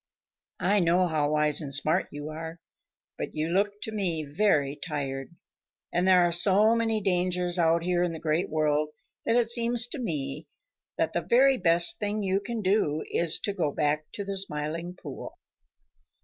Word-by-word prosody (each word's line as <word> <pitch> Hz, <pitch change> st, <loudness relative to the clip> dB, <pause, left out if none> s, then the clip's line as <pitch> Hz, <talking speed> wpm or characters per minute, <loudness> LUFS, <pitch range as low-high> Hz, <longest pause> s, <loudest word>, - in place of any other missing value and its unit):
I 205 Hz, +3 st, +3 dB
know 175 Hz, +1 st, +3 dB
how 155 Hz, -4 st, 0 dB
wise 150 Hz, 0 st, +2 dB
and 140 Hz, -3 st, -6 dB
smart 155 Hz, +6 st, +1 dB
you 145 Hz, +1 st, -7 dB
are, 160 Hz, +2 st, -7 dB, 0.6 s
but -, -, -5 dB
you 155 Hz, +1 st, -2 dB
look 200 Hz, +4 st, +1 dB
to 220 Hz, -, -4 dB
me 175 Hz, -7 st, -2 dB
very 145 Hz, -4 st, +1 dB
tired, 140 Hz, -1 st, -5 dB, 0.6 s
and 180 Hz, +2 st, +1 dB
there 185 Hz, -1 st, +6 dB
are 175 Hz, -, +1 dB
so 195 Hz, +5 st, +5 dB
many 225 Hz, -2 st, 0 dB
dangers 180 Hz, -1 st, 0 dB
out 165 Hz, 0 st, +2 dB
here 175 Hz, 0 st, 0 dB
in 175 Hz, -1 st, 0 dB
the 165 Hz, -, -6 dB
Great 160 Hz, +3 st, -1 dB
World 150 Hz, -1 st, 0 dB, 0.4 s
that 230 Hz, -, +3 dB
it 240 Hz, -2 st, +2 dB
seems 235 Hz, 0 st, +2 dB
to 295 Hz, -, -5 dB
me 150 Hz, -, -4 dB, 0.5 s
that 165 Hz, -, 0 dB
the 175 Hz, -, 0 dB
very 255 Hz, +9 st, +3 dB
best 170 Hz, -1 st, +3 dB
thing 210 Hz, 0 st, -2 dB
you 190 Hz, 0 st, +1 dB
can 225 Hz, +1 st, -5 dB
do 185 Hz, -6 st, +1 dB
is 170 Hz, -1 st, +2 dB
to 205 Hz, -, -2 dB
go 170 Hz, -7 st, -1 dB
back 150 Hz, +1 st, -1 dB
to 205 Hz, -, -3 dB
the 195 Hz, 0 st, -2 dB
Smiling 165 Hz, 0 st, -3 dB
Pool." -, -, -9 dB
175 Hz, 175 wpm, -27 LUFS, 155-200 Hz, 0.6 s, there